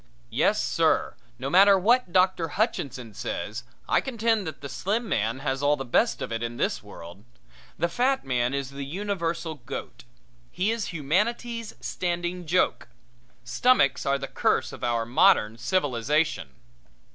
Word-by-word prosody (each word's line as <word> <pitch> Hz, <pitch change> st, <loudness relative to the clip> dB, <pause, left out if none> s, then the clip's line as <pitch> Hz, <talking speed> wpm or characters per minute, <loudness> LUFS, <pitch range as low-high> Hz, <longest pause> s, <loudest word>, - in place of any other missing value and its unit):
Yes 200 Hz, -, +2 dB
sir, 165 Hz, -1 st, +1 dB, 0.2 s
no 130 Hz, +3 st, -4 dB
matter 195 Hz, +6 st, +6 dB
what 230 Hz, +1 st, +2 dB
Doctor 185 Hz, -2 st, +3 dB
Hutchinson 140 Hz, -, -2 dB
says, 110 Hz, +3 st, -4 dB, 0.2 s
I -, -, +3 dB
contend 225 Hz, -6 st, 0 dB
that 155 Hz, -, -7 dB
the 140 Hz, -, -5 dB
slim 205 Hz, -, -2 dB
man 115 Hz, -, 0 dB
has 135 Hz, -1 st, -2 dB
all 145 Hz, +1 st, +3 dB
the 135 Hz, -, -5 dB
best 120 Hz, -, +1 dB
of -, -, -5 dB
it 115 Hz, 0 st, -2 dB
in 120 Hz, 0 st, -4 dB
this -, -, -1 dB
world. 85 Hz, +4 st, -12 dB, 0.5 s
The 170 Hz, -, +1 dB
fat 255 Hz, -, 0 dB
man 125 Hz, -2 st, 0 dB
is 140 Hz, -1 st, -3 dB
the 140 Hz, 0 st, -6 dB
universal 170 Hz, 0 st, -3 dB
goat; 120 Hz, +1 st, -7 dB, 0.4 s
he 185 Hz, -, 0 dB
is 230 Hz, -2 st, -2 dB
humanity's 215 Hz, -, -1 dB
standing 175 Hz, 0 st, -3 dB
joke. 180 Hz, +3 st, +1 dB, 0.6 s
Stomachs 135 Hz, -, +3 dB
are 140 Hz, 0 st, +1 dB
the 135 Hz, 0 st, -5 dB
curse -, -, 0 dB
of -, -, -10 dB
our 120 Hz, -1 st, 0 dB
modern 115 Hz, -2 st, +3 dB
civilization. 145 Hz, -, 0 dB
160 Hz, 150 wpm, -26 LUFS, 125-195 Hz, 0.6 s, matter